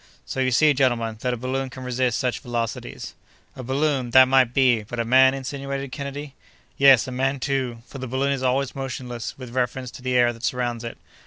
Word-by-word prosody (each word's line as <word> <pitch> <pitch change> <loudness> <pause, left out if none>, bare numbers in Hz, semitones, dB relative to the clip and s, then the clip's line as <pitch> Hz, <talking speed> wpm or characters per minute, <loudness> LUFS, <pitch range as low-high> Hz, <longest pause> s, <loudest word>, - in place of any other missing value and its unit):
So - - -5
you 130 -1 +2
see, 150 +4 +4
gentlemen, 120 -5 0
that 125 - 0
a 125 - -2
balloon 130 +2 -3
can 130 0 -9
resist 125 -1 0
such 125 -2 -1
velocities." 120 -2 -5 0.4
"A 130 - -7
balloon—that 130 -1 +3
might 130 -2 +4
be; 125 -3 +3
but 115 +3 -7
a 115 - 0
man?" 130 +2 +5
insinuated 135 0 -5
Kennedy. 140 0 -6 0.4
"Yes, 135 -4 +6
a - - -5
man, 135 +2 -1
too!—for 130 -2 -3
the 130 - -5
balloon 135 +3 0
is 135 -2 -2
always 130 +1 0
motionless 125 -3 -5
with 125 -3 -9
reference 125 0 -2
to - - -11
the 125 0 -1
air 120 -1 +4
that 115 - -14
surrounds 120 -2 -2
it. 115 - -6
130 Hz, 195 wpm, -23 LUFS, 120-135 Hz, 0.4 s, Yes